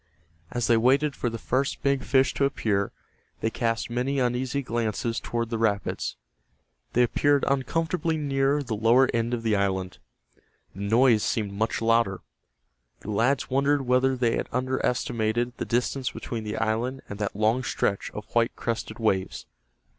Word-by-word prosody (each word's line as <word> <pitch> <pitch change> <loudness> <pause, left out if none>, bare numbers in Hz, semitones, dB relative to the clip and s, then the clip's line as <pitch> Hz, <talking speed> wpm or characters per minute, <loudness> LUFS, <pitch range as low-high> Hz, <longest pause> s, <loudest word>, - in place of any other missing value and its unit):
As 120 -1 -1
they 115 - +4
waited 140 +5 +3
for 120 - -1
the 115 - -5
first 130 +4 -1
big 140 -2 +1
fish 130 +2 +3
to 140 - +1
appear 105 -7 0 0.5
they 110 - 0
cast 115 +1 -1
many 125 +4 -1
uneasy 130 +2 0
glances 115 -1 -1
toward 115 0 -3
the 115 - -1
rapids. 105 -3 -1 0.8
They 125 - +4
appeared 145 +4 +2
uncomfortably 160 +5 0
near 140 0 +1
the 115 -4 -3
lower 115 +5 +4
end 115 0 0
of 115 - -6
the 110 -2 +2
island. 95 -2 -1 0.7
The 100 - -9
noise 115 +2 +4
seemed 105 -2 -1
much 110 +2 -1
louder. 115 -5 +2 0.8
The 105 - -6
lads 125 +6 +1
wondered 140 +1 +2
whether 130 +1 +2
they 120 -2 +1
had - - -3
underestimated 120 -2 -1
the - - -3
distance 125 +2 0
between 115 -5 -6
the 105 - -3
island 120 +5 -1
and 100 - -7
that 105 -2 -2
long 110 +4 +2
stretch 100 -4 -1
of 105 - -8
white 120 0 +2
crested 115 -1 -3
waves. 100 -5 -1
120 Hz, 160 wpm, -26 LUFS, 110-135 Hz, 0.8 s, they